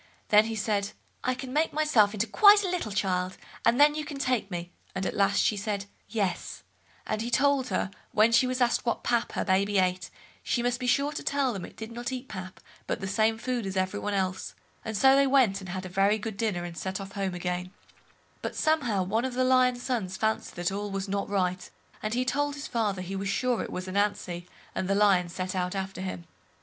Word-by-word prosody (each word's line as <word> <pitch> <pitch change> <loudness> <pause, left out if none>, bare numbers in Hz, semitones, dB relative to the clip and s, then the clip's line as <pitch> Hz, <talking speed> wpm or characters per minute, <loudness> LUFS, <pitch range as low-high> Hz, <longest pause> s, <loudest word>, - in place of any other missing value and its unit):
Then 210 0 +6
he 225 0 -3
said, 205 -1 -1 0.3
I 255 0 +1
can 255 0 -7
turn 310 +2 +3
myself 240 -10 +3
into 210 +2 +1
quite 405 - +7
a - - 0
little 350 -12 -2
child, 185 -2 -1 0.3
and 240 - +3
then 295 +1 +7
you 305 0 -3
can 295 -1 -7
take 255 -7 0
me, 175 -1 -5 0.2
and 190 - -2
at - - -2
last 200 -1 +3
she 215 - +3
said 200 -1 -3 0.2
"Yes"; 200 -6 -2 0.4
and 215 0 -2
he 235 - -3
told 275 +1 +3
her, 195 - -1 0.2
when 215 +2 +4
she 235 +2 +5
was 255 0 -2
asked 240 -1 +2
what 235 - -1
pap 235 -1 0
her - - -1
baby 200 +1 +2
ate, 185 0 +1 0.3
she 240 - -1
must 245 0 0
be 250 - -3
sure 280 +3 +2
to - - -5
tell 275 -3 0
them 195 -3 -5
it - - -14
did 220 +1 -7
not 240 +2 -4
eat 260 0 -5
pap, 185 -4 -8 0.3
but - - -1
the 190 - -4
same 220 +3 +2
food 245 0 -2
as 190 0 -4
every 185 +2 0
one 205 -1 -2
else; 190 -1 -2 0.3
and 220 -2 -3
so 265 +4 +6
they 275 0 +4
went, 255 -8 +4
and 190 - -8
had 185 +1 -4
a - - -6
very 195 +3 +3
good 220 0 -5
dinner, 205 -5 -1
and 175 -1 -6
set 190 +1 -3
off 195 0 -7
home 195 -2 -2
again—but 180 +1 -7
somehow 245 -11 +1
one 220 +6 0
of 260 -1 -3
the 255 - +2
lion's 255 -1 +3
sons 210 -8 -2
fancied 220 0 -1
that 175 +1 -1
all 205 +1 -3
was 195 0 -3
not 200 0 -2
right, 185 -2 -1 0.3
and 215 +2 -2
he 250 +1 +1
told 290 +2 0
his 285 +1 -6
father 205 -5 -1
he 190 +2 -5
was 195 +1 -2
sure 245 +3 +1
it - - -5
was 185 +1 -5
Ananzi, 185 -3 -1 0.3
and 185 - -2
the 195 - +2
Lion 195 -4 +4
set 185 +1 -4
out 180 0 -1
after 190 -1 -4
him. 185 -2 -5
210 Hz, 230 wpm, -28 LUFS, 190-250 Hz, 0.4 s, quite